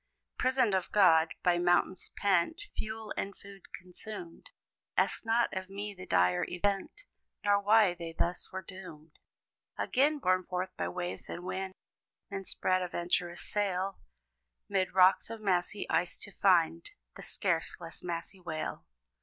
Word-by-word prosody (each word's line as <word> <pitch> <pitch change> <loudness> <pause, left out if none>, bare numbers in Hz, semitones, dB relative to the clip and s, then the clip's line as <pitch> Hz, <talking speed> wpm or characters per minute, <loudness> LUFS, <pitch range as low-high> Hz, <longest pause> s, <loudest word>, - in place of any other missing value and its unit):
Prisoned 255 -5 +2
of 190 -1 0
God; 165 -5 +5
by 175 -1 +3
mountains 175 +1 +2
pent, 200 - +2 0.2
Fuel 220 0 -4
and 195 0 -4
food 200 -1 -14
consumed; 180 -1 -9 0.5
Ask - - +2
not 230 +1 +2
of 190 0 -4
me 205 +1 -5
the 185 -1 -10
dire 90 0 +3
event, 200 - -2 0.4
Nor 200 0 +4
why 210 -2 +5
they 170 -1 -6
thus 175 +1 -1
were 190 0 -5
doomed. 165 -5 -11 0.6
Again, 290 +4 +2
borne 185 -8 +2
forth 185 +1 -3
by - - -2
waves 180 -1 -4
and 175 - -5
wind, 190 +1 -4 0.6
Men 195 -1 -4
spread 185 0 +1
a 180 - -1
venturous 175 0 -1
sail, 195 -2 -1 0.7
'Mid 190 -2 +1
rocks 185 +2 +5
of 225 -1 -6
massy 195 0 0
ice 175 +1 +1
to 200 - -7
find 170 -4 +3 0.2
The - - -10
scarce 175 -5 -1
less 165 -1 -8
massy 175 +2 -5
whale. 160 -3 -5
185 Hz, 145 wpm, -31 LUFS, 175-200 Hz, 0.7 s, God